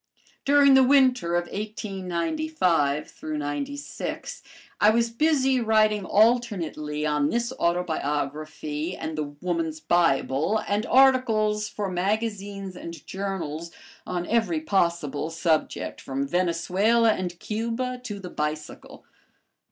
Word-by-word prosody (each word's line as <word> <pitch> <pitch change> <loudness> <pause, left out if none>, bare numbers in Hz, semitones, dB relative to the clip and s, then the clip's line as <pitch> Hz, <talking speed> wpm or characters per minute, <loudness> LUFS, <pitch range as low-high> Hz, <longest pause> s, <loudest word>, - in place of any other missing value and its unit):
During 280 -1 +6
the 265 0 +7
winter 255 -10 +4
of 175 - +2
1895 185 - -1
96 155 - -4 0.4
I 210 - +6
was 230 +1 +2
busy 270 -1 +2
writing 215 -2 +3
alternately 185 -10 +1
on 150 -1 +1
this 235 +1 -1
autobiography 155 -1 -2
and 160 0 -4
"The 155 - -1 0.2
Woman's 165 -3 -2
Bible," 165 +2 +2
and 210 +3 0
articles 225 -5 +3
for 205 -1 -3
magazines 195 0 -2
and 170 -1 -9
journals 170 -5 -4 0.4
on 175 -1 -2
every 205 -9 +1
possible 170 -4 0
subject 165 -1 -1
from 135 +1 -3
Venezuela 185 +7 +2
and 180 -3 -4
Cuba 235 +3 -3
to 205 -4 -5
the 180 -2 -8
bicycle. 150 0 -5
185 Hz, 105 wpm, -25 LUFS, 160-225 Hz, 0.4 s, the